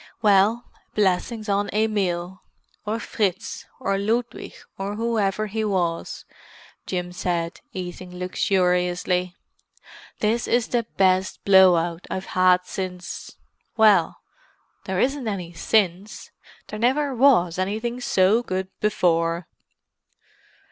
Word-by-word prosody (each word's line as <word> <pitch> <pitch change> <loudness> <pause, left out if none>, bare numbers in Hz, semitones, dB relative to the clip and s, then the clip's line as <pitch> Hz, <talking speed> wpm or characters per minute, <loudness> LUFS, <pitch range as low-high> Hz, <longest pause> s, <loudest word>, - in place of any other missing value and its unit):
"Well, 210 +3 +4 0.3
blessings 210 +3 0
on 205 0 0
Emil, 190 -4 -1 0.5
or 220 +2 -1
Fritz, 200 -6 -3
or 195 -6 -1
Ludwig, 230 +4 -2 0.2
or 195 +1 -4
whoever 215 -2 0
he 220 +1 -3
was," 180 -5 -2 0.6
Jim 180 -1 -3
said, 175 -2 -2
eating 180 0 -7
luxuriously. 180 -1 0 0.8
"This 225 +3 0
is 240 -1 +1
the 235 -2 0
best 185 0 +2
blow 190 -2 +7
out 170 +1 -2
I've 190 0 -4
had 180 0 +4
since—well, 185 +1 -1 0.7
there 190 -2 -2
isn't 270 0 0
any 180 -5 -4
since, 195 +2 -1 0.4
there 215 - -6
never 270 +4 +1
was 230 -10 +4
anything 220 +6 -2
so 220 -4 +3
good 190 -4 -3
before!" 170 -4 +1
195 Hz, 105 wpm, -23 LUFS, 180-220 Hz, 0.8 s, blow